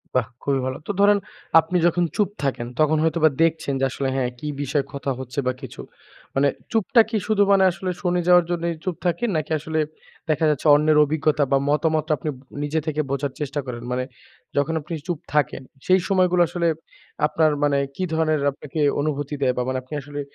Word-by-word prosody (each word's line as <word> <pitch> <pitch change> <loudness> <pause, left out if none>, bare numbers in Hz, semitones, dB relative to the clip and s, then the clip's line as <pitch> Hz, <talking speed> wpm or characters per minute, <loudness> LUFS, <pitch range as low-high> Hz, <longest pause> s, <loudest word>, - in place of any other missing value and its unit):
বাহ্! 125 -3 +2 0.2
খুবই 140 -1 +1
ভালো। 130 0 -3
তো - - 0
ধরেন 205 0 +6 0.4
আপনি 165 +3 0
যখন 175 +1 +2
চুপ 205 -3 +2
থাকেন, 130 -4 -1
তখন 155 0 +3
হয়তোবা 160 0 +3
দেখছেন 160 -3 0
যে 135 - +2
আসলে 135 +1 -2
হ্যাঁ, 130 -2 0
কি 150 - -6
বিষয়ে 140 0 0
কথা 140 0 -3
হচ্ছে 130 +1 -5
বা 130 - +2
কিছু? 130 - -8 0.5
মানে 140 +1 +3 0.2
চুপটা 225 +1 +4
কি 225 - 0
শুধু 215 -2 +3
মানে 195 -1 +5
আসলে 185 +1 -5
শুনে 180 -1 +1
যাওয়ার 180 -1 +6
জন্যই 170 0 -1
চুপ 185 -3 -2
থাকেন, 175 +7 0
নাকি 155 0 -4
আসলে 160 +1 -2 0.5
দেখা 155 +1 +2
যাচ্ছে 150 0 0
অন্যের 150 +1 +3
অভিজ্ঞতা 150 0 +1
বা 135 - +5
মতামতটা 155 +1 +1
আপনি 150 - -4 0.3
নিজে 150 +2 0
থেকে 155 -1 0
বোঝার 140 0 -1
চেষ্টা 145 0 -3
করেন? 120 -2 -6
মানে 125 0 0 0.5
যখন 145 +3 +1
আপনি 155 +3 -8
চুপ 175 -4 -2
থাকেন, 145 -3 +1 0.2
সেই 185 +1 +5
সময়গুলো 180 -2 +3
আসলে 170 0 -1 0.6
আপনার 155 0 +2
মানে 145 -1 +3 0.2
কি 185 - -3
ধরনের 155 -2 +1
আপনাকে 145 +2 -7 0.2
অনুভূতি 145 -1 -2
দেয় 130 -2 +2
বা - - +1
মানে 130 0 -1
আপনি 130 - -12
আসলে 145 +1 -7
155 Hz, 190 wpm, -23 LUFS, 140-170 Hz, 0.6 s, ধরেন